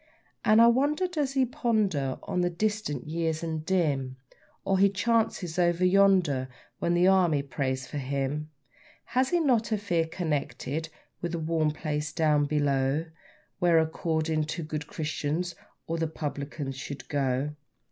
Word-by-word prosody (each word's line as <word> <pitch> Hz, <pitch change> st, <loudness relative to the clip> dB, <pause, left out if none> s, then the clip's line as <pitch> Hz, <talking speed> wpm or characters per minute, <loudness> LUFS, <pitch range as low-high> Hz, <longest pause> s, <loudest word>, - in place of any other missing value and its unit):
And 215 Hz, +1 st, +5 dB
I 230 Hz, -, +9 dB
wonder 285 Hz, +9 st, +3 dB
does 300 Hz, -7 st, -1 dB
he 265 Hz, -1 st, +3 dB
ponder 215 Hz, -, 0 dB
on 180 Hz, -, -1 dB
the 175 Hz, -, +2 dB
distant 205 Hz, -, -2 dB
years 160 Hz, 0 st, -2 dB
and 160 Hz, -2 st, -3 dB
dim, 145 Hz, -8 st, 0 dB, 0.5 s
Or 195 Hz, -1 st, +2 dB
his 200 Hz, 0 st, +4 dB
chances 205 Hz, -5 st, 0 dB
over 175 Hz, +1 st, +3 dB
yonder, 180 Hz, -9 st, +4 dB, 0.3 s
when 170 Hz, -, +1 dB
the 175 Hz, +1 st, +4 dB
Army 175 Hz, -7 st, +4 dB
prays 130 Hz, -2 st, -2 dB
for 145 Hz, -, -5 dB
him? 140 Hz, +3 st, -2 dB, 0.6 s
Has 255 Hz, +2 st, +1 dB
he 350 Hz, -, +2 dB
not 240 Hz, -8 st, +2 dB
a 215 Hz, -, +2 dB
fear 175 Hz, -5 st, 0 dB
connected 160 Hz, -2 st, -3 dB, 0.3 s
with 175 Hz, -1 st, -3 dB
the -, -, -1 dB
warm 160 Hz, -1 st, +1 dB
place 150 Hz, -1 st, -3 dB
down 150 Hz, -2 st, +3 dB
below, 145 Hz, 0 st, +1 dB, 0.5 s
Where, 175 Hz, -2 st, +4 dB
according 160 Hz, -1 st, 0 dB
to 165 Hz, +2 st, -4 dB
good 150 Hz, -1 st, -5 dB
Christians, 160 Hz, +2 st, -2 dB, 0.3 s
all 165 Hz, -, -2 dB
the 165 Hz, 0 st, 0 dB
publicans 145 Hz, -2 st, -5 dB
should 135 Hz, +2 st, -7 dB
go? 135 Hz, 0 st, 0 dB
160 Hz, 150 wpm, -28 LUFS, 145-190 Hz, 0.6 s, I